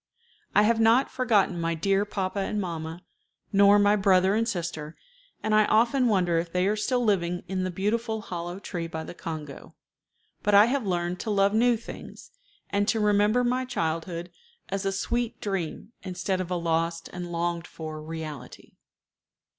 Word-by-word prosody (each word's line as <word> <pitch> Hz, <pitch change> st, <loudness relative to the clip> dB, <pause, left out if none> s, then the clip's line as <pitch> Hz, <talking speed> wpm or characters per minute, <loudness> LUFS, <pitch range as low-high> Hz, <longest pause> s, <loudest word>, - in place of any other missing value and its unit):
I 210 Hz, -, +6 dB
have 225 Hz, +1 st, +3 dB
not 230 Hz, +4 st, +4 dB
forgotten 210 Hz, -9 st, +2 dB
my 165 Hz, 0 st, 0 dB
dear 195 Hz, +4 st, +1 dB
papa 195 Hz, -1 st, -3 dB
and 210 Hz, +2 st, -1 dB
mamma, 165 Hz, -2 st, -5 dB, 0.5 s
nor 200 Hz, +1 st, +6 dB
my 205 Hz, 0 st, +4 dB
brother 190 Hz, -1 st, +4 dB
and 225 Hz, +2 st, +1 dB
sister, 165 Hz, -5 st, -4 dB, 0.5 s
and 215 Hz, 0 st, 0 dB
I 215 Hz, 0 st, +5 dB
often 245 Hz, +4 st, +3 dB
wonder 180 Hz, -6 st, +2 dB
if 165 Hz, 0 st, -4 dB
they 180 Hz, +1 st, +1 dB
are 205 Hz, +2 st, +2 dB
still 245 Hz, +4 st, 0 dB
living 180 Hz, -4 st, 0 dB
in 185 Hz, 0 st, -2 dB
the 185 Hz, -, -1 dB
beautiful 220 Hz, +5 st, -1 dB
hollow 175 Hz, -3 st, -5 dB
tree 175 Hz, -4 st, -5 dB
by 160 Hz, -1 st, -5 dB
the -, -, -8 dB
Congo; 155 Hz, -5 st, -8 dB, 0.7 s
but 205 Hz, 0 st, +3 dB
I 205 Hz, +1 st, +9 dB
have 250 Hz, -2 st, -1 dB
learned 175 Hz, 0 st, -1 dB
to -, -, -4 dB
love 200 Hz, -1 st, +3 dB
new 235 Hz, +2 st, +4 dB
things, 230 Hz, -, -11 dB, 0.4 s
and 205 Hz, 0 st, +1 dB
to 225 Hz, 0 st, +2 dB
remember 210 Hz, +3 st, +3 dB
my 250 Hz, +1 st, +1 dB
childhood 170 Hz, -4 st, -3 dB, 0.4 s
as 195 Hz, 0 st, -2 dB
a -, -, +1 dB
sweet 235 Hz, +4 st, -2 dB
dream 195 Hz, 0 st, -4 dB
instead 185 Hz, 0 st, -2 dB
of 180 Hz, -, -5 dB
a 180 Hz, -, -1 dB
lost 165 Hz, 0 st, -1 dB
and 175 Hz, -1 st, -6 dB
longed 170 Hz, 0 st, -2 dB
for 155 Hz, -1 st, -7 dB
reality. 155 Hz, -5 st, -8 dB
190 Hz, 170 wpm, -27 LUFS, 170-215 Hz, 0.7 s, I